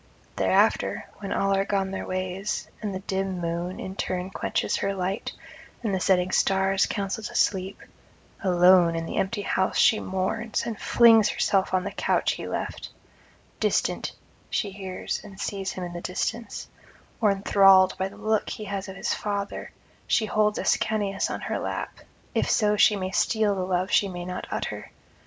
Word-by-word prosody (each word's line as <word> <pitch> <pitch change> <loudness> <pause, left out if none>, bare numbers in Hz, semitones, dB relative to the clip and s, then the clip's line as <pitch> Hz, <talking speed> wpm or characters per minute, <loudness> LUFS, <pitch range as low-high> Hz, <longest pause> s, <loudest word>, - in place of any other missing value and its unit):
Thereafter, - - +2
when 200 -1 -6
all 195 0 +1
are 195 0 +2
gone 195 -1 -1
their 190 - -4
ways, 185 +2 -3
and 210 -2 -3
the 190 0 -5
dim 190 -1 -2
moon 170 +2 -3
in 190 - -6
turn 185 -1 -3
quenches - - -1
her 195 0 -1
light, 190 +2 -2 0.5
and 215 -4 -1
the 190 - +1
setting 185 -1 +2
stars 195 0 +2
counsel 200 +2 -3
to - - -6
sleep, 190 -1 +1 0.6
alone 180 -2 +5
in 165 0 -2
the - - -5
empty 205 +2 -1
house 190 -1 0
she 215 - +5
mourns, 190 +4 -2
and 225 -3 -4
flings 225 -3 +6
herself 195 -1 +1
on 185 -1 +1
the - - -4
couch - - +1
he - - -5
left: - - -4 0.7
distant - - 0 0.4
she 205 - -1
hears 190 -1 -5
and 200 -2 -12
sees 195 -2 -3
him 185 - -5
in 175 -1 -6
the 175 - -6
distance; 225 +6 -3 0.5
or 215 - +5
enthralled 195 -1 +5
by 190 - 0
the 200 +1 -13
look 215 0 0
he 215 - -5
has 200 -1 -4
of 190 - -8
his - - -1
father, 200 -1 -4 0.4
she 220 - +2
holds 210 0 +1
Ascanius 205 -3 0
on - - -4
her - - -2
lap, - - -4 0.3
if - - +1
so 210 -2 +3
she 210 0 +5
may 185 -1 -3
steal 215 0 +2
the 190 - -2
love 185 +1 -1
she 200 - +4
may 175 -2 -6
not 180 0 -5
utter. - - -4
195 Hz, 175 wpm, -26 LUFS, 185-205 Hz, 0.7 s, flings